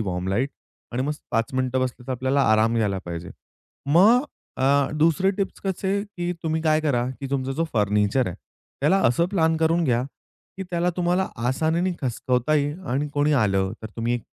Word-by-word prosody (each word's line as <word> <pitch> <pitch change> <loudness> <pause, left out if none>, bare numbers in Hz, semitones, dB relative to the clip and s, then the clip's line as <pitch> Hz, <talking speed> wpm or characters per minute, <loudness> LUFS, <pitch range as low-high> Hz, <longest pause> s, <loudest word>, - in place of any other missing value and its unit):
Warm 90 -3 -2
light 120 +8 +1 0.4
आणि 125 +2 -1
मस्त 150 +2 -3
5 115 +2 0
मिनिटं 130 0 0
बसलं 125 -1 -3
तर 130 - -2
आपल्याला 130 +2 +1
आराम 110 +1 +3
घ्यायला 105 -4 +1
पाहिजे. 85 +1 -6 0.6
मग 205 - +5 0.3
अ, 130 - +1 0.3
दुसरे 165 +5 +3
टिप्स 195 0 -3
कसे, 195 +1 -1
की 175 -4 -4
तुम्ही 160 -1 -1
काय 155 -1 +3
करा, 135 -6 +1 0.2
की 140 - -4
तुमचा 135 -1 -1
जो 165 +5 0
फर्निचर 105 +3 +2
आहे 90 - -4 0.4
त्याला 155 +8 +3
असं 145 +9 +2
प्लॅन 160 -5 +2
करून 165 +2 +2
घ्या, 120 -4 +2 0.5
की 195 - -4
त्याला 175 0 +1
तुम्हाला 180 +1 +1 0.2
आसानीने 160 +7 +1
खसकवता 125 +2 0
येईल 145 +2 0
आणि 145 +3 0
कोणी 145 +1 +2
आलं 95 -2 +1
तर - - -4
तुम्ही 120 +1 0
140 Hz, 175 wpm, -24 LUFS, 120-165 Hz, 0.6 s, मग